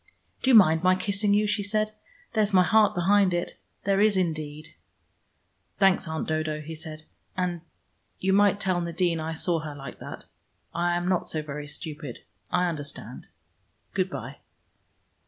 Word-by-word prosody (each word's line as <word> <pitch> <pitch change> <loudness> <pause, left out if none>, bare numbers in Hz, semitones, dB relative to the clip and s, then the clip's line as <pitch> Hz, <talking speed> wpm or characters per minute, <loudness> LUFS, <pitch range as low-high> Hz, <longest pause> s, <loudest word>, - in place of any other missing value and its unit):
"Do 265 - +1
you 255 - +7
mind 160 -6 +7
my 185 0 +4
kissing 200 +1 +1
you?" 210 +1 +3
she 210 0 0
said. 215 +1 0 0.4
"There's 215 -2 +2
my 185 - +7
heart 215 +1 +4
behind 190 +1 +3
it. 175 - -3 0.2
There 195 +1 +2
is, 210 -2 +4
indeed." 155 -4 -2 1.1
"Thanks, 195 -2 +3
Aunt 160 0 -3
Dodo," 155 -1 -1
he 155 +2 -7
said. 155 -1 -8 0.3
"And 180 -1 +1
and 170 -1 -8 0.6
you 190 +1 +1
might 205 0 +4
tell 185 -3 0
Nadine 170 0 0
I 160 +1 -3
saw 165 +1 +1
her 155 -2 -6
like 140 -1 -9
that. - - -9 0.5
I 175 +1 +1
am 175 0 -2
not 185 -1 0
so 155 -1 -1
very 145 0 -6
stupid. 145 -3 -7 0.3
I 180 0 +2
understand: 150 -4 -6 0.7
good - - 0
by." - - -7
175 Hz, 165 wpm, -26 LUFS, 155-200 Hz, 1.1 s, you